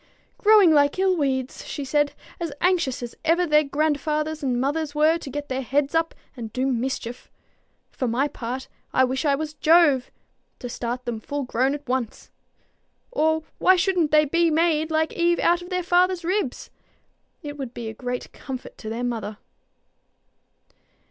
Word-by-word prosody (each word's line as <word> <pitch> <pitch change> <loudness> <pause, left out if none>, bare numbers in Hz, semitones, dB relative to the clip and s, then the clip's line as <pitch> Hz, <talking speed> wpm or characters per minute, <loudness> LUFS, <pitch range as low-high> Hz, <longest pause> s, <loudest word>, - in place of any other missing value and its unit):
"Growing 420 -5 +6
like 285 0 +4
ill 380 0 +3
weeds," 265 -5 -1
she 285 - -5
said; 290 +1 +1 0.3
"as 335 -3 -3
anxious 335 -9 +1
as 240 - -6
ever 340 +2 +3
their 300 -2 +4
grandfathers 305 +1 -1
and 255 -3 0
mothers 290 +3 -1
were 310 +2 +4
to 285 - -8
get 290 +2 -5
their 260 0 -2
heads 275 +4 0
up 325 0 +1 0.2
and 230 -4 -7
do 255 +3 -1
mischief. 250 -1 -3 0.6
For 255 - -2
my 250 +5 +1
part 255 -1 -5 0.3
I 260 - +4
wish 260 +4 -1
I 280 -1 +4
was 310 +1 -4
Jove, 305 -4 +4 0.5
to 245 - -6
start 245 +1 -4
them 235 -2 -3
full 285 +5 -4
grown 260 +2 0
at 290 -1 -10
once. 250 -3 -3 0.8
Or 315 -7 +1 0.2
why 370 - +6
shouldn't 360 -3 +2
they 305 0 +5
be 335 +3 +2
made 315 -1 +2
like 315 0 0
Eve 345 0 +2
out 345 +1 +2
of 350 - -10
their 365 -1 -1
father's 360 0 +2
ribs? 365 -7 -2 0.7
It 290 -1 -6
would 260 -4 -5
be 235 -2 -6
a 220 - -5
great 250 +2 -5
comfort 260 -2 -8
to 220 - -6
their 230 +2 -3
mother." 220 -4 -3
290 Hz, 170 wpm, -24 LUFS, 255-330 Hz, 0.8 s, Growing